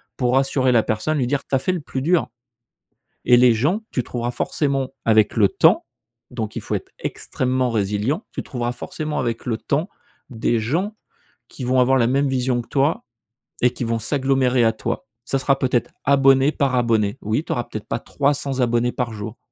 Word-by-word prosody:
pour 125 0 +1
rassurer 135 -1 +2
la 115 -2 +4
personne, 150 +8 -1
lui 130 -4 0
dire: 140 +1 -1
«Tu - - -11
as 130 - +3
fait 185 - 0
le 175 - -3
plus 135 -2 -4
dur», 170 +2 +2 1.0
et 125 - +6
les 125 -1 +6
gens, 150 - +1
tu 125 - -1
trouveras 120 0 -3
forcément, 135 0 -1 0.2
avec 110 -1 +4
le 105 -3 +5
temps- - - +4 0.5
donc 110 -4 -4
il - - -3
faut - - -3
être - - -6
extrêmement 130 -1 -1
résilient- 105 - -1
tu - - -4
trouveras 120 -2 -3
forcément 150 +4 -4
avec 115 -3 -2
le 115 -3 -1
temps, 155 - -1 0.4
des 115 -1 0
gens 175 - -1 0.5
qui 130 - -8
vont 130 +1 +2
avoir 130 +1 +4
la 115 -2 +3
même 140 +2 +1
vision 125 -2 0
que - - -16
toi 140 +2 +1 0.6
et 125 0 +4
qui 125 - -4
vont 115 0 -1
s'agglomérer 130 0 +1
à 115 - +4
toi. 115 +2 -4 0.2
Ça 135 - 0
sera 135 +1 +1
peut-être 125 -2 0
abonné 135 0 +5
par 135 -3 0
abonné. 110 -4 +1
Oui 110 +8 -1
tu - - -5
auras 120 - -1
peut-être 110 - -7
pas - - -2
300 140 -1 -1
abonnés 120 0 +1
par 120 -2 -2
jour. 110 +2 -7
125 Hz, 195 wpm, -21 LUFS, 115-135 Hz, 1.0 s, et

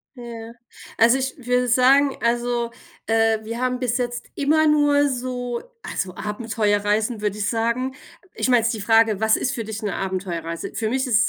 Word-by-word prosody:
Ja. 230 -1 -8 0.4
Also, 235 +3 +5
ich 265 0 -3
würde 250 0 0
sagen, 265 +3 +4
also, 240 0 0 0.3
äh, 225 -1 +2
wir 230 +3 -5
haben 250 0 0
bis 245 -1 0
jetzt 240 -1 -3
immer 310 +2 +3
nur 290 -1 +4
so 245 -2 -3 0.2
also, 185 -1 -4
Abenteuerreisen, 210 0 -1
würde 210 0 -1
ich 205 -1 -1
sagen. 235 +3 -1 0.4
Ich - - -1
meine 245 -2 +5
jetzt 230 +2 0
die 215 - -5
Frage, 225 -1 +3
was 220 0 +4
ist 265 - -1
für 230 - -3
dich 220 +1 -6
'ne 210 - -2
Abenteuerreise? 175 -3 -4
Für 220 -1 -2
mich 260 +2 0
ist 230 -1 +4
235 Hz, 175 wpm, -22 LUFS, 220-250 Hz, 0.4 s, Also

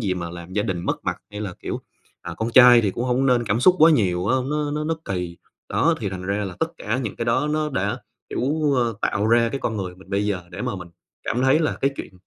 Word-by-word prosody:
gì 95 -5 0
mà 85 -1 -5
làm 85 +1 -9
gia 105 - +1
đình 95 -5 -2
mất - - -2
mặt, - - -1
hay 105 0 -7
là 95 -4 -4
kiểu, - - -4 0.4
à, - - -6
con 110 +1 -2
trai 125 -1 +8
thì 100 -3 0
cũng 120 - -3
hông 130 +2 +1
nên 120 -2 +3
cảm 110 +2 0
xúc 185 +6 +6
quá 160 +1 +7
nhiều 95 - +2
á, 130 +4 +3
nó 150 -1 -1
nó 150 +1 -2
nó 165 +1 0
kỳ. 90 -3 -4 0.3
Đó, - - +2
thì 100 - -1
thành 95 -1 -6
ra 100 +2 -1
là 95 -2 -6
tất - - 0
cả 110 +5 -2
những 115 -6 -4
cái 115 - -2
đó 130 +6 +1
nó 155 0 0
đã, 100 -4 -1 0.3
kiểu 145 +2 0
ờ, 120 -3 +1
tạo 105 +2 0
ra 115 0 +4
cái 135 +4 -4
con 110 - -2
người 90 -2 -4
mình 95 +1 -17
bây 100 +1 0
giờ 95 -3 -1
để 90 - -6
mà - - -2
mình 90 -1 -8 0.4
cảm 125 +2 -1
thấy 135 +4 +4
là 155 - 0
cái 135 - +2
chuyện - - -7
115 Hz, 275 wpm, -23 LUFS, 95-130 Hz, 0.4 s, trai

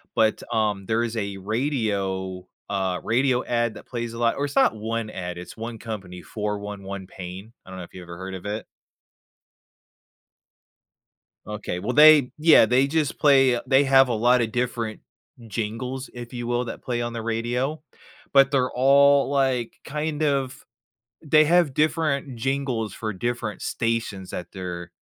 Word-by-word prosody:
but, 110 -1 +2
um, 105 -3 0
there 110 +3 +1
is 115 -1 -3
a 100 -2 -3
radio 100 -5 -2 0.2
uh, 95 -2 -1
radio 125 +2 +2
ad 120 -1 0
that - - -11
plays 120 -2 -5
a 115 - -7
lot 115 -1 +2
or 145 - 0
it's 140 - -6
not - - +4
one 110 +1 -3
ad, 90 -3 -6
it's 90 - -9
one 115 +1 -6
company, 95 -6 -7
411 100 -2 -5
PAIN? 95 +3 -9
I - - -14
don't 95 - -8
know 90 - -6
if - - -14
you 90 - -9
ever 85 -1 -10
heard 95 +1 -7
of 95 0 -8
it? 105 +2 -4 2.8
Okay, 105 -4 -4
well, 115 +6 -2
they 150 -3 +7
Yeah, 155 -5 +7
they 125 +4 +3
just 155 -1 -1
play 135 -4 +5
they 135 +1 +5
have 135 -1 +5
a 120 - -1
lot 120 +3 +3
of 110 -1 -1
different 120 -2 -2 0.5
jingles, 115 +5 -4
if 120 0 -8
you 120 -1 -4
will, 120 +1 0
that 115 - -7
play 120 -1 -2
on 120 0 -3
the 115 - -4
radio, 120 +6 -2 0.5
but 135 -1 +6
they're 130 -3 +2
all, 140 +2 +5
like, 130 -4 0
kind 150 +1 -3
of 135 -3 -1 0.6
they 155 0 +5
have 170 -3 +3
different 150 -4 0
jingles 130 -4 -2
for 110 -1 -4
different 115 0 -3
stations 115 -5 -2
that 90 - -6
their 90 -2 -6
115 Hz, 165 wpm, -24 LUFS, 105-135 Hz, 2.8 s, they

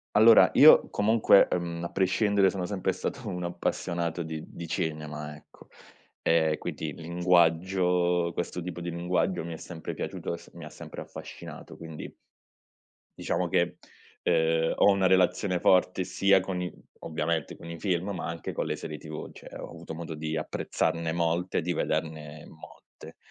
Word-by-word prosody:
Allora 110 +2 +8
io - - +8
comunque, 105 -1 +5
uhm, 85 -1 -2
a - - -2
prescindere 95 +1 +3
sono 90 -2 -3
sempre 95 -1 -1
stato 110 +5 -5
un 90 -1 -4
appassionato 85 0 -2
di 80 -1 -6
di 85 - -8
cinema, 75 -3 -4
ecco. 75 - -18 0.5
Ehm, 80 -2 +3
quindi - - -5
linguaggio 90 +1 +2
questo 85 +1 -4
tipo 85 -1 -6
di 85 0 -4
linguaggio 90 0 -1
mi 85 - -6
è 80 - -6
sempre 80 -3 -7
piaciuto - - -4
e 85 - -4
s - - -16
mi 85 -2 -9
ha 75 - -9
sempre 75 - -9
affascinato, - - -10
quindi 80 -2 -9 1.0
diciamo - - -1
che, - - +1 0.5
ehm, 80 0 +2
ho 100 - +6
una 95 -1 +3
relazione 95 0 +2
forte 90 0 +3
sia 95 +1 +3
con 95 -1 -3
i 90 - -4 0.3
ovviamente 80 -1 -2
con 85 - -11
i 85 - -6
film, 95 0 -1
ma 90 - -4
anche 85 -1 -5
con - - -2
le - - -2
serie 75 -1 -6
TV, 75 0 -8
cioè - - -12
ho - - -7
avuto 80 - -9
modo 80 -1 -6
di 80 +1 -3
apprezzarne 80 +1 -1
molte 85 +2 0
e - - 0
di 90 +1 -1
vederne 75 -1 -3
molte. 80 - -14
85 Hz, 165 wpm, -28 LUFS, 80-90 Hz, 1.0 s, Allora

